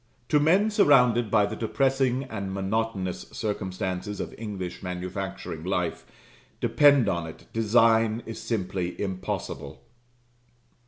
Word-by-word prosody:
To 150 - +4
men 185 +9 +3
surrounded 125 - +4
by 105 -1 +4
the 105 +2 -4
depressing 130 +3 +1
and 100 -7 -5
monotonous 95 -1 -2
circumstances 95 -1 -3
of - - -4
English 100 -5 -6
manufacturing 90 -3 -5
life, 90 -2 -2 0.5
depend 145 -6 +5
upon 85 -3 -1
it, 80 - -11
design 115 0 +3
is 115 - -7
simply 95 -5 -3
impossible. 95 -2 -4
105 Hz, 110 wpm, -26 LUFS, 95-120 Hz, 0.5 s, depend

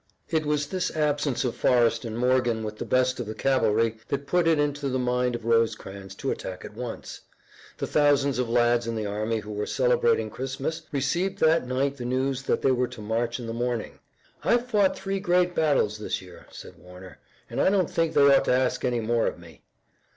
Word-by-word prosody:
It 155 -2 0
was 150 -1 +1
this 185 +5 -2
absence 145 -4 0
of 120 - -2
Forrest 120 -2 +2
and 115 0 -5
Morgan 120 -2 +1
with 105 0 -6
the - - -3
best 130 0 +1
of 120 - -4
the 110 - -5
cavalry 115 -4 +1
that 140 0 -3
put 175 +2 +1
it 165 -1 +4
into 145 -1 -1
the 130 - -1
mind 125 -1 0
of 115 -1 -7
Rosecrans 100 -4 -1
to 135 - -2
attack 90 -1 -6
at - - -10
once. 120 +1 -7 0.6
The - - -2
thousands 140 -3 +2
of 125 -2 -1
lads 120 0 +2
in 115 - -2
the 110 -1 -2
army 110 +2 -2
who 105 0 -9
were 105 0 -3
celebrating 475 -2 +2
Christmas 135 +4 -4
received 170 +8 -1
that 160 -7 +3
night 135 +2 -1
the 125 - -6
news 130 +1 -1
that 135 - -1
they 135 - +4
were 125 0 +1
to 120 -1 -11
march 115 +3 -2
in 120 - -6
the 115 - -4
morning. 120 -1 -3 0.4
"I've 240 +1 +2
fought 205 -6 +2
three 195 0 -3
great 180 -2 +2
battles 140 -10 +1
this 105 - -3
year," 90 -2 -14
said - - -12
Warner, 90 +1 -13 0.3
"and - - -2
I - - +4
don't 190 -4 +2
think 165 -1 -1
they 145 - +5
ought - - +3
to - - +1
ask 130 0 0
any 120 -2 0
more 115 +1 +1
of - - -3
me." 85 -2 -15
125 Hz, 210 wpm, -26 LUFS, 115-145 Hz, 0.6 s, they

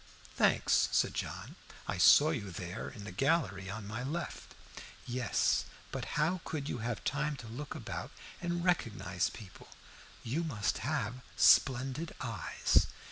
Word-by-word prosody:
"Thanks," - - +3
said - - +2
John. - - -5 0.3
"I - - -2
saw 155 +2 +8
you 110 -10 -3
there, 90 +2 -5
in 105 - -10
the 105 - -7
gallery 100 - +1
on 105 +1 -5
my 110 +4 -4
left." 155 +6 -5 0.5
"Yes; 125 0 +1 0.3
but - - -3
how 165 +4 +1
could 145 -3 -4
you 120 - -3
have 115 -1 -3
time 150 +1 0
to 120 -4 -9
look 130 +7 -6
about - - -5 0.3
and 175 0 -2
recognize 105 - 0
people? 100 -4 -12 0.6
You 140 +9 -1
must 110 -12 -1
have 125 -2 -2
splendid 135 +5 +4
eyes." 115 -6 +1
125 Hz, 140 wpm, -33 LUFS, 105-150 Hz, 0.6 s, saw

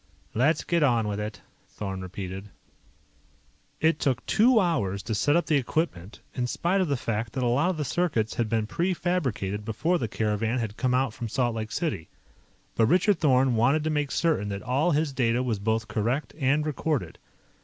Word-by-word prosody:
"Let's 140 +8 +2
get 170 -1 +1
on 120 -6 +3
with 105 0 -2
it," 105 0 -5 0.3
Thorn 95 -2 -5
repeated. 95 +2 -6 1.3
It 160 -1 +2
took 130 -3 0
two 230 +2 +4
hours 100 - 0
to 110 - -3
set 145 +8 +2
up 170 - +2
the 155 -3 +3
equipment, 120 - -2
in 125 -1 -1
spite 180 +9 0
of 185 - +1
the 140 -2 0
fact 110 -1 -3
that 130 - -2
a - - +2
lot 140 +9 +2
of 185 - -2
the 150 - -2
circuits 130 -9 0
had 115 -2 -1
been 110 -1 +1
prefabricated 160 - -1
before 155 +12 0
the 115 - -1
caravan 110 +2 -1
had 110 -4 -3
come 125 0 +1
out 130 -3 +1
from 115 0 -5
Salt 120 +1 0
Lake 110 -1 -4
City. 150 - -2 0.6
But 115 - +3
Richard 185 - +3
Thorn 130 -4 +3
wanted 130 +7 +3
to 155 - 0
make 150 -2 0
certain 155 -13 0
that 100 0 -5
all 135 +8 +1
his 150 -2 +1
data 120 -1 +1
was 115 -5 -1
both 110 +2 -1
correct 120 +7 -1
and 145 +2 +2
recorded. 145 - -2
125 Hz, 190 wpm, -26 LUFS, 110-155 Hz, 1.3 s, two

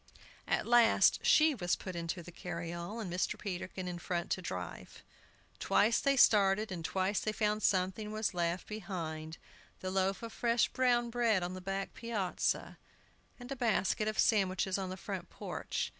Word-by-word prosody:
At - - +1
last 235 -1 +5
she 310 0 +5
was 180 -8 0
put 185 -2 -7
into 170 +1 -4
the 175 - -10
carryall, 170 +4 -5
and 185 -6 -4
Mr. 180 - -1
Peterkin 185 -1 -5
in 175 -1 -4
front 175 -1 -3
to 185 - 0
drive. 90 - -7 0.6
Twice 225 +3 +3
they 275 0 +2
started, 205 -2 +5
and 175 -3 -5
twice 190 +4 0
they 215 - -1
found 215 0 0
something 190 +2 +1
was 215 -1 -1
left 175 0 -1
behind, 165 -6 -5 0.4
the 185 - -4
loaf 190 +2 0
of 230 - -6
fresh 235 0 +2
brown 240 -2 +2
bread 230 -6 +2
on 180 +1 -3
the 185 - -7
back 195 +1 -3
piazza, 220 -6 -2 0.6
and 245 +2 -10
a - - -1
basket 220 -3 +1
of 215 - -2
sandwiches 190 -2 +2
on 190 -1 -3
the 185 - -5
front 185 -3 -6
porch. - - -4
195 Hz, 170 wpm, -33 LUFS, 180-220 Hz, 0.6 s, last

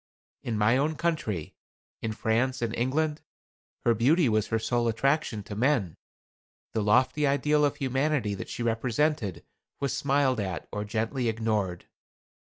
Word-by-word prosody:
In 115 -3 -2
my 110 +4 +4
own 150 +3 +1
country, 140 - -2 0.5
in 110 - -2
France 120 +3 0
and 115 -1 -1
England, 150 +5 0 0.6
her 120 - +5
beauty 140 - +3
was 110 -1 +1
her 110 - 0
sole 120 +1 0
attraction 130 -1 0
to 100 - -7
men. 115 - +1 0.8
The 110 - 0
lofty 130 +7 +3
ideal 150 +2 +2
of 145 -1 +2
humanity 135 -4 0
that 95 - -6
she 120 - -4
represented 120 - 0 0.3
was 140 -1 -1
smiled 135 -3 +2
at 95 -4 -3
or 105 0 -3
gently 115 +3 -1
ignored. 110 -5 -1
120 Hz, 145 wpm, -28 LUFS, 110-140 Hz, 0.8 s, her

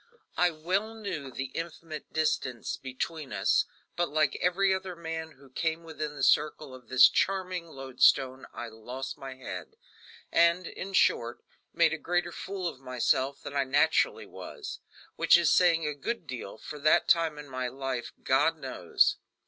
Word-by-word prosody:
I 180 - +4
well 185 +7 -2
knew 185 -11 -5
the 130 +1 -5
infinite 165 -2 -6
distance 130 -6 -1
between 135 +3 -5
us; 95 -2 +2 0.3
but 175 0 0
like 155 -1 +2
every 190 +2 +2
other 190 -1 -4
man 160 -1 -5
who 135 0 -19
came 160 +4 -1
within 155 -2 -5
the 140 - -4
circle 150 +1 +2
of 125 -2 -13
this 130 0 +8
charming 185 -1 -1
lodestone 135 -2 +2
I 120 - -6
lost 125 +4 -6
my 135 -1 -7
head, 130 - -8 0.6
and, 170 +2 +4
in 195 +3 -7
short, 120 -9 +2 0.3
made 165 -2 +3
a 160 - -3
greater 175 +2 0
fool 190 0 -4
of 150 - -6
myself 130 +1 0
than 145 0 -7
I 140 - +3
naturally 145 +4 +2
was 420 -4 -8 0.4
which - - +6
is 170 -2 +3
saying 170 -3 +4
a 150 - -1
good 180 +7 -4
deal 125 -7 -7
for 150 +6 -9
that 155 +2 +4
time 165 -3 +3
in 150 0 -8
my 130 -1 -3
life, 130 -1 -4
God 160 +5 +3
knows! 130 - +1
155 Hz, 165 wpm, -29 LUFS, 130-170 Hz, 0.6 s, this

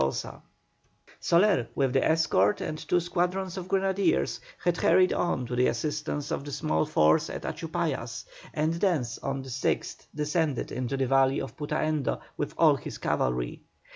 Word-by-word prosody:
Soler, 170 - +3
with 135 -3 +1
the 135 - +3
escort 160 - +3
and 155 - -3
two 165 +3 +1
squadrons 180 +2 -1
of 185 -2 -5
grenadiers, 195 - +1 0.2
had 175 -1 +2
hurried 185 +2 +4
on 175 -8 0
to 125 +1 -4
the 125 +1 +3
assistance 145 +3 -2
of - - -2
the 145 - -7
small 80 - 0
force 75 +1 +3
at - - -6
Achupallas, - - -3 0.3
and 155 +2 0
thence 165 - 0
on 135 -1 -3
the 135 - -9
6th 130 +2 -2
descended 150 -1 -1
into 130 +2 -2
the 135 - +1
valley 135 +1 +3
of - - -6
Putaendo 150 -1 -1 0.2
with - - -4
all - - +5
his - - -7
cavalry. 60 -1 -1
150 Hz, 155 wpm, -28 LUFS, 130-175 Hz, 0.3 s, all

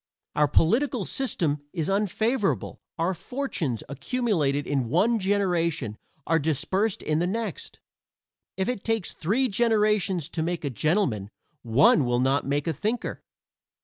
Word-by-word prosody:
Our 150 0 +4
political 230 - +2
system 165 - 0
is 165 -4 -1
unfavorable. 210 +3 0 0.2
Our 170 +3 +1
fortunes, 180 - -3
accumulated 145 - 0
in 135 -5 -1
one 230 - +3
generation, 175 - 0 0.3
are 165 0 +2
dispersed 185 - 0
in 155 0 0
the 175 - +1
next. 230 - -4 0.8
If 190 - 0
it 250 -5 -2
takes 225 -5 0
three 225 +11 0
generations 210 - +2
to 160 - -3
make 170 -1 -2
a 140 - -1
gentleman 125 - 0 0.3
one 125 +5 +4
will 120 0 +1
not 135 +2 +1
make 145 +1 0
a 165 - 0
thinker. 215 - -3
175 Hz, 135 wpm, -26 LUFS, 145-215 Hz, 0.8 s, Our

